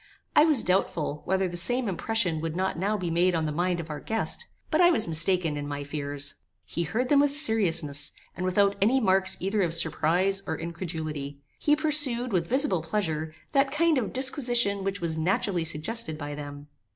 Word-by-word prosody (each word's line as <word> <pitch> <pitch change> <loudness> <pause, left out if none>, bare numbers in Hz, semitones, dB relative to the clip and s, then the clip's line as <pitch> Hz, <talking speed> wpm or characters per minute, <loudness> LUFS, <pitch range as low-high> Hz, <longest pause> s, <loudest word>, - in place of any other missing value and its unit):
I 300 - +7
was 300 -7 +3
doubtful, 170 -5 -1
whether 190 0 0
the 175 - -6
same 245 +8 +4
impression 190 -3 -1
would 165 0 -4
not 190 +1 -1
now 200 +5 -1
be 180 -4 -3
made 175 +2 +2
on 160 -1 0
the 155 - -2
mind 175 +3 -1
of 160 -1 -6
our 150 - -5
guest; 225 - -2 0.2
but 315 +2 +3
I 350 - +7
was 275 - +1
mistaken 165 -1 +1
in 145 0 -5
my 145 0 -5
fears. 145 -1 -4 0.3
He 170 - -4
heard 220 +10 -2
them 290 - +5
with 290 0 +4
seriousness, 175 - +1 0.2
and 180 - -5
without 200 +2 +2
any 240 +7 +3
marks 190 -3 +2
either 200 +3 -1
of 170 -3 0
surprize 175 +4 +2
or 160 - -2
incredulity. 155 -4 -6 0.2
He 295 - +3
pursued, 290 -6 +2
with 170 -2 0
visible 250 - +2
pleasure, 160 -3 -3 0.2
that 275 0 +2
kind 330 -2 +2
of 225 - -4
disquisition 245 -6 +2
which 195 0 -3
was 160 -2 -1
naturally 185 +1 0
suggested 160 +2 -2
by 145 -1 -6
them. 145 0 -8
185 Hz, 190 wpm, -26 LUFS, 160-225 Hz, 0.3 s, I